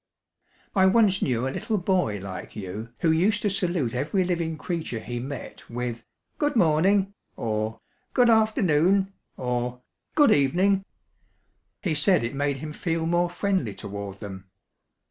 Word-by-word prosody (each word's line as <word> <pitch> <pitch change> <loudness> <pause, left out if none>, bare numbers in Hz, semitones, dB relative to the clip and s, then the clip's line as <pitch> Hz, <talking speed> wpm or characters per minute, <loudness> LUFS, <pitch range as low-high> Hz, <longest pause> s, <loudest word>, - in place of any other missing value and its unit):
"I 190 -1 +5
once 195 -2 +4
knew 125 0 0
a 135 - -3
little 220 - -1
boy 180 - +1
like 95 -1 -7
you 105 +3 -6
who 165 - +4
used 195 +6 +2
to 205 - +2
salute 175 - 0
every 150 +9 0
living 170 -3 -1
creature 165 -8 -3
he 120 +2 -5
met 135 +3 -7
with 120 -1 -4 0.4
'Good 290 -2 +1
morning' 190 +2 +3 0.2
or 110 0 -2 0.3
'Good 245 -2 +5
afternoon' 195 -3 +3 0.2
or 125 0 -2 0.3
'Good 295 -2 +6
evening.' 185 +8 +3 1.0
He 175 -6 +1
said 155 +1 +4
it 120 +3 -2
made 140 0 0
him 150 +2 -6
feel 165 0 -1
more 175 +1 +2
friendly 175 - -1
toward 100 -1 -6
them. 95 -2 -8
160 Hz, 145 wpm, -26 LUFS, 120-190 Hz, 1.0 s, Good